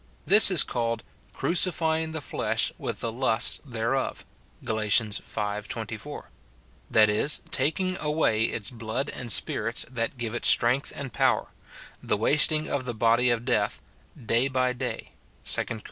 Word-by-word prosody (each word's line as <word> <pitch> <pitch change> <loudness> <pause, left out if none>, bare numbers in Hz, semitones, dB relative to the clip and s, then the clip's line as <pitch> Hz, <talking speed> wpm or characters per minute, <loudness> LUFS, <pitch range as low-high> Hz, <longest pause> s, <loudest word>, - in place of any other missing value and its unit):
This 210 +2 +9
is 180 -6 +5
called 115 -2 -3 0.2
" - - -33
crucifying 160 -2 +1
the 160 -1 -4
flesh - - -1
with - - -5
the 115 - -3
lusts 120 -1 +2
thereof," 125 0 -3 0.4
Gal. 110 0 -2
v. 110 -1 -3 0.8
24; - - -7 0.6
that 110 -1 +5
is, 105 +8 +1
taking 170 +6 0
away 150 -8 0
its 110 -1 -3
blood 115 +3 -4
and 120 -3 -5
spirits - - +1
that 120 +1 -3
give 115 -2 -5
it 120 - -5
strength 125 +4 +3
and 135 -5 -7
power, - - 0 0.3
— - - -15
the 105 - -1
wasting 155 +6 +3
of 135 -3 -3
the 120 -2 -5
body 115 +3 +2
of 120 0 -1
death 110 -3 0 0.4
"day 120 0 0
by 130 -1 0
day," 125 0 -6 0.3
2 - - +3
Cor. 115 - -6
125 Hz, 155 wpm, -25 LUFS, 115-145 Hz, 0.8 s, This